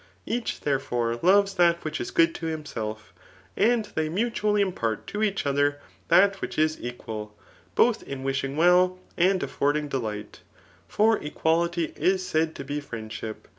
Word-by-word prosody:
Each, 235 Hz, 0 st, -3 dB
therefore, 120 Hz, -4 st, -1 dB
loves 195 Hz, +2 st, +4 dB
that 170 Hz, -2 st, +3 dB
which 155 Hz, -2 st, -3 dB
is 120 Hz, -, -4 dB
good 165 Hz, 0 st, +3 dB
to 165 Hz, -, -5 dB
himself, 110 Hz, -9 st, -5 dB, 0.4 s
and 225 Hz, +1 st, +3 dB
they 155 Hz, -1 st, -1 dB
mutually 210 Hz, +2 st, 0 dB
impart 115 Hz, -, -2 dB
to 210 Hz, -, -4 dB
each 205 Hz, -5 st, 0 dB
other 145 Hz, +1 st, +2 dB, 0.3 s
that 195 Hz, 0 st, +4 dB
which -, -, -5 dB
is 155 Hz, 0 st, +1 dB
equal, 110 Hz, -3 st, -6 dB, 0.4 s
both -, -, +3 dB
in 135 Hz, -1 st, -7 dB
wishing 135 Hz, +1 st, -2 dB
well 180 Hz, +2 st, +4 dB, 0.2 s
and 185 Hz, +1 st, +2 dB
affording 145 Hz, +1 st, 0 dB
delight; 105 Hz, -6 st, -4 dB, 0.5 s
for 220 Hz, +1 st, +3 dB
equality 165 Hz, +2 st, 0 dB
is 185 Hz, 0 st, +1 dB
said 160 Hz, 0 st, 0 dB
to -, -, -6 dB
be 145 Hz, +2 st, -3 dB
friendship. 110 Hz, -4 st, -7 dB
155 Hz, 150 wpm, -26 LUFS, 135-185 Hz, 0.5 s, loves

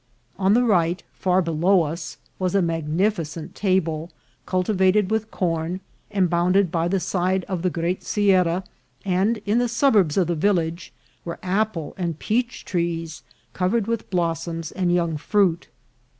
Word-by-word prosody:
On 195 Hz, +2 st, +4 dB
the 245 Hz, -, +4 dB
right, 180 Hz, -6 st, +2 dB
far 185 Hz, 0 st, +1 dB
below 170 Hz, +3 st, +3 dB
us, 165 Hz, +2 st, -5 dB, 0.2 s
was 185 Hz, 0 st, 0 dB
a 195 Hz, -, +4 dB
magnificent 165 Hz, 0 st, -1 dB
table 170 Hz, -5 st, 0 dB, 0.4 s
cultivated 190 Hz, +1 st, +2 dB
with 220 Hz, 0 st, 0 dB
corn, 170 Hz, -1 st, -2 dB, 0.3 s
and 190 Hz, -3 st, +2 dB
bounded 175 Hz, +2 st, +2 dB
by 165 Hz, 0 st, 0 dB
the 195 Hz, +2 st, +1 dB
side 185 Hz, +1 st, 0 dB
of 185 Hz, -3 st, -4 dB
the 185 Hz, -, +1 dB
great 175 Hz, +2 st, -2 dB
sierra; 185 Hz, -3 st, +2 dB, 0.4 s
and 195 Hz, +5 st, +1 dB
in 210 Hz, +3 st, +2 dB
the 245 Hz, -1 st, +1 dB
suburbs 220 Hz, -, +3 dB
of 190 Hz, -, +4 dB
the 170 Hz, -, -1 dB
village 170 Hz, -1 st, 0 dB, 0.3 s
were 170 Hz, -, -5 dB
apple 185 Hz, -4 st, -1 dB
and 170 Hz, -4 st, -2 dB
peach 240 Hz, +7 st, -2 dB
trees 165 Hz, -3 st, -2 dB, 0.3 s
covered 195 Hz, +4 st, +1 dB
with 230 Hz, 0 st, -3 dB
blossoms 165 Hz, -2 st, -2 dB
and 180 Hz, -2 st, 0 dB
young 170 Hz, -3 st, +1 dB
fruit. 180 Hz, 0 st, +1 dB
180 Hz, 150 wpm, -23 LUFS, 165-195 Hz, 0.4 s, On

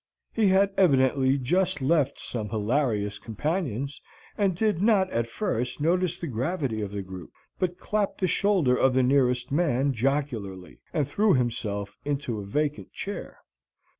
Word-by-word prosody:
He 220 Hz, -3 st, +3 dB
had 195 Hz, +1 st, +4 dB
evidently 135 Hz, -6 st, +4 dB
just 175 Hz, +6 st, +1 dB
left 140 Hz, 0 st, +2 dB
some 110 Hz, -4 st, -4 dB
hilarious 105 Hz, -2 st, 0 dB
companions, 140 Hz, -, -3 dB, 0.3 s
and 195 Hz, -4 st, +1 dB
did 205 Hz, -2 st, +1 dB
not 200 Hz, -3 st, +3 dB
at 115 Hz, 0 st, -1 dB
first 125 Hz, -, -2 dB
notice 175 Hz, +2 st, +1 dB
the 175 Hz, -, -5 dB
gravity 130 Hz, -2 st, -2 dB
of 105 Hz, -, -3 dB
the 100 Hz, 0 st, -5 dB
group, 95 Hz, -3 st, -9 dB, 0.3 s
but 180 Hz, -1 st, -1 dB
clapped 210 Hz, -2 st, -1 dB
the 190 Hz, -, +2 dB
shoulder 180 Hz, -8 st, +2 dB
of 130 Hz, 0 st, +3 dB
the 130 Hz, -, +4 dB
nearest 125 Hz, -1 st, +2 dB
man 140 Hz, -3 st, +2 dB
jocularly, 115 Hz, -, -2 dB
and 150 Hz, -6 st, 0 dB
threw 200 Hz, +6 st, +3 dB
himself 110 Hz, -5 st, -2 dB
into 140 Hz, -6 st, -2 dB
a -, -, -5 dB
vacant 150 Hz, +8 st, -2 dB
chair. 200 Hz, +1 st, -6 dB
140 Hz, 150 wpm, -26 LUFS, 115-175 Hz, 0.3 s, had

